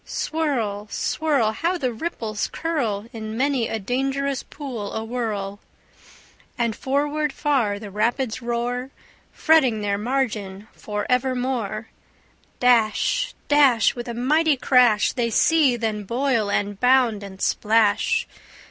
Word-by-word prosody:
Swirl, 235 Hz, -10 st, -2 dB
swirl! 280 Hz, -8 st, 0 dB
How 340 Hz, +11 st, -1 dB
the 255 Hz, -7 st, -2 dB
ripples 220 Hz, -6 st, -3 dB
curl 240 Hz, -11 st, -2 dB
In 220 Hz, -1 st, -6 dB
many 265 Hz, -3 st, +1 dB
a 225 Hz, -, -2 dB
dangerous 270 Hz, +5 st, -1 dB
pool 250 Hz, -9 st, -7 dB
awhirl! 220 Hz, -3 st, -3 dB, 1.0 s
And 235 Hz, -3 st, 0 dB
forward 295 Hz, +2 st, -1 dB
far 260 Hz, -9 st, 0 dB
the 205 Hz, -1 st, -9 dB
rapids 230 Hz, +4 st, -1 dB
roar, 240 Hz, +2 st, -2 dB, 0.4 s
Fretting 265 Hz, -9 st, +3 dB
their 200 Hz, -1 st, -1 dB
margin 215 Hz, -5 st, -2 dB
for 210 Hz, -1 st, -4 dB
evermore. 250 Hz, -4 st, -1 dB, 0.7 s
Dash, 250 Hz, -, +2 dB
dash, 275 Hz, -7 st, +4 dB
With 240 Hz, 0 st, -7 dB
a 235 Hz, -, -5 dB
mighty 300 Hz, +5 st, +2 dB
crash, 245 Hz, -5 st, +4 dB
They 240 Hz, -2 st, 0 dB
seethe, 265 Hz, -2 st, +3 dB
and 210 Hz, -2 st, -2 dB
boil, 240 Hz, -3 st, 0 dB
and 205 Hz, 0 st, -1 dB
bound, 250 Hz, -4 st, +3 dB
and 195 Hz, -1 st, -10 dB
splash. 220 Hz, -, +2 dB
240 Hz, 120 wpm, -23 LUFS, 215-275 Hz, 1.0 s, dash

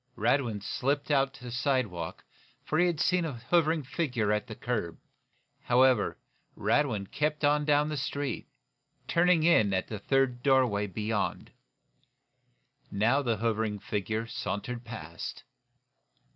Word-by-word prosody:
Radwin 115 Hz, -3 st, +1 dB
slipped 140 Hz, +7 st, -1 dB
out 135 Hz, -1 st, +3 dB
to 125 Hz, -, -14 dB
the 120 Hz, -, -6 dB
sidewalk, 120 Hz, -, -1 dB, 0.4 s
for 155 Hz, -, 0 dB
he 180 Hz, -, +5 dB
had 170 Hz, -3 st, -1 dB
seen 180 Hz, +1 st, +2 dB
a 160 Hz, -4 st, -3 dB
hovering 155 Hz, +6 st, +1 dB
figure 125 Hz, -7 st, -1 dB
at 105 Hz, 0 st, 0 dB
the 110 Hz, -, -7 dB
curb. 110 Hz, -10 st, -3 dB, 0.7 s
However, 125 Hz, -2 st, +3 dB, 0.4 s
Radwin 125 Hz, -9 st, +1 dB
kept 150 Hz, 0 st, 0 dB
on 150 Hz, 0 st, +3 dB
down 150 Hz, 0 st, +3 dB
the 150 Hz, -, -3 dB
street, 140 Hz, +1 st, -3 dB, 0.6 s
turning 170 Hz, -1 st, +3 dB
in 110 Hz, -, +4 dB
at 95 Hz, -, -2 dB
the 105 Hz, -, -5 dB
third 130 Hz, +2 st, +1 dB
doorway 125 Hz, -7 st, +3 dB
beyond. 105 Hz, +2 st, -2 dB, 1.4 s
Now, 115 Hz, +8 st, +2 dB
the 120 Hz, -5 st, 0 dB
hovering 110 Hz, -1 st, 0 dB
figure 110 Hz, +3 st, -3 dB
sauntered 115 Hz, +2 st, -4 dB
past. 95 Hz, -8 st, -7 dB
125 Hz, 130 wpm, -29 LUFS, 105-145 Hz, 1.4 s, he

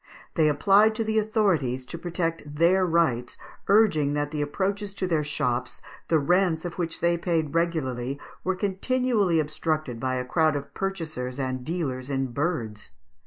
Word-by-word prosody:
They 160 Hz, -3 st, +3 dB
applied 200 Hz, +8 st, +4 dB
to 225 Hz, -, 0 dB
the 220 Hz, 0 st, +1 dB
authorities 175 Hz, -, +1 dB
to 170 Hz, -, -7 dB
protect 165 Hz, -4 st, -3 dB
their 180 Hz, +4 st, +4 dB
rights, 155 Hz, -8 st, +1 dB, 0.3 s
urging 190 Hz, -9 st, +4 dB
that 145 Hz, 0 st, -1 dB
the 150 Hz, -1 st, -2 dB
approaches 195 Hz, +6 st, -2 dB
to 190 Hz, -, -2 dB
their 165 Hz, -4 st, +1 dB
shops, 125 Hz, -4 st, -2 dB, 0.3 s
the 165 Hz, -, +3 dB
rents 175 Hz, +2 st, +2 dB
of 175 Hz, +1 st, -6 dB
which 165 Hz, -1 st, -3 dB
they 170 Hz, 0 st, +2 dB
paid 160 Hz, -4 st, 0 dB
regularly, 140 Hz, -6 st, -1 dB, 0.2 s
were 190 Hz, 0 st, 0 dB
continually 205 Hz, -1 st, +1 dB
obstructed 155 Hz, -4 st, -2 dB
by 130 Hz, 0 st, -1 dB
a 125 Hz, 0 st, -2 dB
crowd 155 Hz, +2 st, +2 dB
of 140 Hz, -, -5 dB
purchasers 160 Hz, -10 st, -4 dB
and 130 Hz, -2 st, -2 dB
dealers 140 Hz, -5 st, -3 dB
in 135 Hz, -2 st, -1 dB
birds. 120 Hz, -7 st, -3 dB
160 Hz, 160 wpm, -26 LUFS, 140-185 Hz, 0.3 s, applied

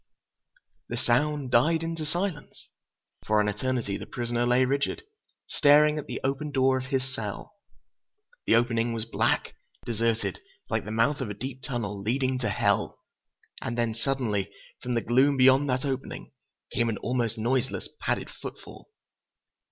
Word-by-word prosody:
"The -, -, -3 dB
sound 140 Hz, +2 st, +1 dB
died 160 Hz, +8 st, +4 dB
into 165 Hz, -2 st, -3 dB
silence. 175 Hz, -1 st, -4 dB, 0.6 s
For 105 Hz, 0 st, +4 dB
an 105 Hz, -, +2 dB
eternity, 105 Hz, -1 st, -1 dB
the -, -, -8 dB
prisoner 120 Hz, 0 st, -1 dB
lay 125 Hz, +1 st, +4 dB
rigid, 140 Hz, -, -1 dB, 0.4 s
staring 150 Hz, +1 st, +5 dB
at 150 Hz, -, -7 dB
the -, -, -4 dB
open 135 Hz, +3 st, -1 dB
door 130 Hz, -1 st, +3 dB
of 130 Hz, -, -6 dB
his 130 Hz, -1 st, -2 dB
cell. 105 Hz, -, -5 dB, 0.9 s
The -, -, +5 dB
opening 115 Hz, 0 st, +2 dB
was 115 Hz, -1 st, -3 dB
black, 115 Hz, -, 0 dB, 0.3 s
deserted, 115 Hz, 0 st, -1 dB, 0.3 s
like -, -, 0 dB
the 105 Hz, -, -5 dB
mouth 115 Hz, +6 st, +2 dB
of 125 Hz, -, -3 dB
a 105 Hz, -, -5 dB
deep 130 Hz, +4 st, -6 dB
tunnel, 115 Hz, -7 st, -3 dB
leading 130 Hz, +4 st, 0 dB
to 120 Hz, -, -1 dB
hell. -, -, +1 dB, 0.6 s
And 120 Hz, -, -3 dB
then, 115 Hz, -1 st, +1 dB
suddenly, 115 Hz, -5 st, -1 dB, 0.3 s
from 125 Hz, -1 st, -2 dB
the 115 Hz, -, +2 dB
gloom 135 Hz, +5 st, +3 dB
beyond 135 Hz, +2 st, +5 dB
that 130 Hz, +2 st, 0 dB
opening, 135 Hz, -1 st, -4 dB, 0.4 s
came 120 Hz, -1 st, +1 dB
an 110 Hz, -, -2 dB
almost 120 Hz, -1 st, -1 dB
noiseless, 120 Hz, +3 st, -1 dB
padded -, -, -2 dB
footfall!" -, -, -10 dB
125 Hz, 150 wpm, -27 LUFS, 115-135 Hz, 0.9 s, staring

